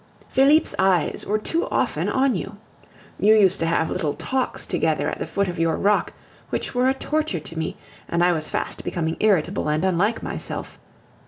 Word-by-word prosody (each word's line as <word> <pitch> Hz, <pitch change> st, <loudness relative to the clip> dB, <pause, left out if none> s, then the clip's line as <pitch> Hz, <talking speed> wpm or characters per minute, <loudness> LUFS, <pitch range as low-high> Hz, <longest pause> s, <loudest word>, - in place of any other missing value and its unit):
Felipe's 290 Hz, +4 st, +4 dB
eyes 190 Hz, -3 st, +1 dB
were 210 Hz, -, +1 dB
too 325 Hz, +10 st, -1 dB
often -, -, 0 dB
on 265 Hz, 0 st, +2 dB
you. 195 Hz, +1 st, -5 dB, 0.6 s
You 215 Hz, +2 st, +5 dB
used 195 Hz, -3 st, +4 dB
to 165 Hz, -, 0 dB
have 165 Hz, -1 st, +1 dB
little 150 Hz, -2 st, -1 dB
talks 260 Hz, -1 st, -2 dB
together -, -, 0 dB
at -, -, -3 dB
the -, -, -3 dB
foot 200 Hz, 0 st, -1 dB
of 175 Hz, -2 st, -4 dB
your 165 Hz, -1 st, +2 dB
rock, 205 Hz, +1 st, +1 dB, 0.4 s
which -, -, -3 dB
were 250 Hz, +1 st, +2 dB
a -, -, +3 dB
torture 300 Hz, -, -1 dB
to 165 Hz, -, -10 dB
me; 160 Hz, -, -3 dB, 0.3 s
and 170 Hz, 0 st, +1 dB
I 180 Hz, -, +4 dB
was 155 Hz, -2 st, -2 dB
fast -, -, -1 dB
becoming 165 Hz, -2 st, -2 dB
irritable 190 Hz, -5 st, +1 dB
and 155 Hz, +4 st, 0 dB
unlike 190 Hz, +5 st, +1 dB
myself. -, -, -5 dB
195 Hz, 185 wpm, -23 LUFS, 165-235 Hz, 0.6 s, You